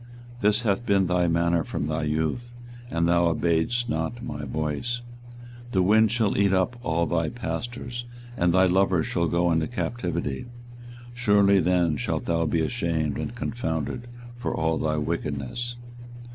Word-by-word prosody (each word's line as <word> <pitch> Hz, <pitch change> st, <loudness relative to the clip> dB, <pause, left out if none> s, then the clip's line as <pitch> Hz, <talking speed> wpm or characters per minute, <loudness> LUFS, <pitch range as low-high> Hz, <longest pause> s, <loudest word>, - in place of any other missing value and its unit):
This 105 Hz, +2 st, +2 dB
hath 110 Hz, +1 st, +1 dB
been 100 Hz, -4 st, +3 dB
thy 90 Hz, -1 st, +2 dB
manner 85 Hz, 0 st, +2 dB
from 70 Hz, -, -3 dB
thy 80 Hz, 0 st, -1 dB
youth, 80 Hz, +11 st, -2 dB, 0.3 s
that 85 Hz, 0 st, +1 dB
thou 85 Hz, 0 st, +4 dB
obeyedst 85 Hz, +9 st, +1 dB
not 80 Hz, +6 st, -2 dB
my 75 Hz, 0 st, -5 dB
voice. 75 Hz, -, -2 dB, 0.7 s
24:022:022 -, -, -14 dB
The 95 Hz, -2 st, +3 dB
wind 110 Hz, +3 st, +5 dB
shall 115 Hz, -3 st, +1 dB
eat 100 Hz, -1 st, +4 dB
up 95 Hz, +6 st, +1 dB
all 85 Hz, -6 st, +1 dB
thy 80 Hz, -1 st, 0 dB
pastors, 120 Hz, +4 st, -5 dB, 0.3 s
and 85 Hz, -7 st, +2 dB
thy 95 Hz, +2 st, +5 dB
lovers 95 Hz, -2 st, +3 dB
shall 85 Hz, -1 st, 0 dB
go 85 Hz, +1 st, +2 dB
into 80 Hz, -1 st, +1 dB
captivity: 120 Hz, -, -3 dB, 0.7 s
surely 100 Hz, -5 st, +4 dB
then 85 Hz, -3 st, +2 dB
shalt -, -, -2 dB
thou 85 Hz, -1 st, +1 dB
be 80 Hz, +1 st, +1 dB
ashamed 80 Hz, -, -1 dB
and 115 Hz, -, -4 dB
confounded 115 Hz, -, -3 dB, 0.3 s
for 125 Hz, -, -2 dB
all 80 Hz, 0 st, 0 dB
thy 75 Hz, 0 st, 0 dB
wickedness. 75 Hz, -, -3 dB
85 Hz, 155 wpm, -26 LUFS, 80-110 Hz, 0.7 s, wind